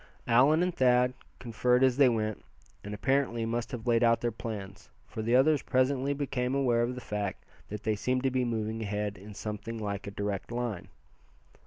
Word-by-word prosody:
Allan 135 Hz, +8 st, +5 dB
and 180 Hz, -1 st, -1 dB
Thad 125 Hz, -2 st, +3 dB, 0.2 s
conferred 125 Hz, +1 st, +1 dB
as 130 Hz, -1 st, +3 dB
they 140 Hz, -3 st, +6 dB
went, 110 Hz, -3 st, -2 dB, 0.4 s
and 105 Hz, -, -7 dB
apparently 120 Hz, +1 st, 0 dB
must 115 Hz, 0 st, -2 dB
have 120 Hz, -3 st, -6 dB
laid 120 Hz, -1 st, +3 dB
out 115 Hz, 0 st, +4 dB
their 120 Hz, -, -1 dB
plans, 100 Hz, -3 st, -7 dB, 0.2 s
for 110 Hz, -, -6 dB
the 115 Hz, +3 st, +2 dB
others 145 Hz, +3 st, +4 dB
presently 130 Hz, +1 st, +1 dB
became 135 Hz, -2 st, -1 dB
aware 125 Hz, -4 st, +2 dB
of 120 Hz, +2 st, -1 dB
the 125 Hz, -, -7 dB
fact 105 Hz, -3 st, -4 dB, 0.2 s
that 105 Hz, 0 st, -6 dB
they 110 Hz, 0 st, +1 dB
seemed 125 Hz, +5 st, -1 dB
to 135 Hz, -, +2 dB
be 130 Hz, 0 st, +1 dB
moving 110 Hz, -1 st, -2 dB
ahead 105 Hz, -1 st, -2 dB
in 100 Hz, +2 st, -11 dB
something 105 Hz, +2 st, -5 dB
like 100 Hz, -2 st, -4 dB
a -, -, -2 dB
direct 100 Hz, +1 st, -4 dB
line. 120 Hz, -6 st, -3 dB
120 Hz, 190 wpm, -29 LUFS, 105-130 Hz, 0.4 s, they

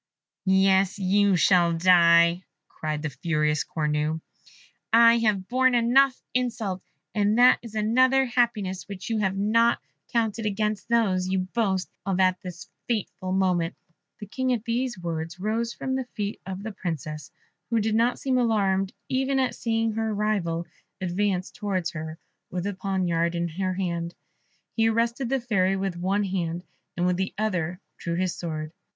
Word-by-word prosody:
"Yes, 190 Hz, 0 st, +3 dB
you 200 Hz, 0 st, +3 dB
shall 175 Hz, -1 st, +4 dB
die," 170 Hz, 0 st, +5 dB, 0.3 s
cried 155 Hz, -1 st, -4 dB
the 155 Hz, -, -2 dB
furious 150 Hz, 0 st, 0 dB
Cornue; 150 Hz, 0 st, -1 dB, 0.7 s
"I 230 Hz, +1 st, +7 dB
have 205 Hz, -4 st, +1 dB
borne 255 Hz, 0 st, +3 dB
enough 255 Hz, +3 st, +4 dB
insults, 230 Hz, -7 st, -2 dB, 0.2 s
and 210 Hz, +1 st, +2 dB
that 250 Hz, +1 st, +6 dB
is 230 Hz, -2 st, -10 dB
another 255 Hz, +5 st, +3 dB
happiness 230 Hz, -7 st, 0 dB
which 200 Hz, +2 st, -6 dB
you 220 Hz, -, +1 dB
have 195 Hz, -2 st, 0 dB
not 230 Hz, +4 st, +3 dB, 0.3 s
counted 225 Hz, -1 st, 0 dB
amongst 210 Hz, 0 st, -2 dB
those 195 Hz, -6 st, +2 dB
you 190 Hz, 0 st, +1 dB
boast 195 Hz, -5 st, 0 dB, 0.2 s
of 195 Hz, -1 st, -1 dB
at 185 Hz, -1 st, +3 dB
this 180 Hz, -1 st, -8 dB, 0.2 s
fatal 205 Hz, -5 st, -3 dB
moment!" 180 Hz, -3 st, +1 dB, 0.4 s
The 210 Hz, -, -7 dB
King 255 Hz, +5 st, -2 dB
at 230 Hz, -2 st, -3 dB
these 235 Hz, 0 st, -1 dB
words 165 Hz, -1 st, -5 dB
rose 225 Hz, +4 st, -1 dB
from 260 Hz, +2 st, -4 dB
the 260 Hz, -1 st, -1 dB
feet 205 Hz, -1 st, -3 dB
of 190 Hz, +1 st, -5 dB
the 220 Hz, -, -4 dB
Princess, 155 Hz, -6 st, -5 dB, 0.4 s
who 230 Hz, -1 st, +2 dB
did 215 Hz, 0 st, 0 dB
not 235 Hz, +2 st, +2 dB
seem 260 Hz, -2 st, 0 dB
alarmed 195 Hz, -5 st, +1 dB
even 265 Hz, +1 st, 0 dB
at 260 Hz, -2 st, +1 dB
seeing 225 Hz, -1 st, 0 dB
her 220 Hz, 0 st, -1 dB
rival 190 Hz, -6 st, -1 dB, 0.3 s
advance 185 Hz, 0 st, -1 dB
towards 190 Hz, -6 st, -2 dB
her 155 Hz, 0 st, -6 dB, 0.3 s
with 180 Hz, 0 st, -4 dB
a 205 Hz, -, -1 dB
poniard 180 Hz, -3 st, -1 dB
in 170 Hz, 0 st, -1 dB
her 185 Hz, +3 st, -2 dB
hand. 170 Hz, -2 st, -3 dB, 0.6 s
He 225 Hz, -1 st, +3 dB
arrested 235 Hz, +3 st, 0 dB
the 270 Hz, 0 st, +1 dB
Fairy 195 Hz, -6 st, +1 dB
with 190 Hz, -2 st, -2 dB
one 190 Hz, +4 st, 0 dB
hand, 175 Hz, -3 st, -2 dB, 0.3 s
and 175 Hz, -, +1 dB
with 180 Hz, 0 st, +1 dB
the 190 Hz, +1 st, -2 dB
other 180 Hz, -5 st, -1 dB, 0.2 s
drew 170 Hz, -2 st, -3 dB
his 185 Hz, 0 st, -1 dB
sword. 155 Hz, -2 st, -5 dB
195 Hz, 160 wpm, -26 LUFS, 175-225 Hz, 0.7 s, I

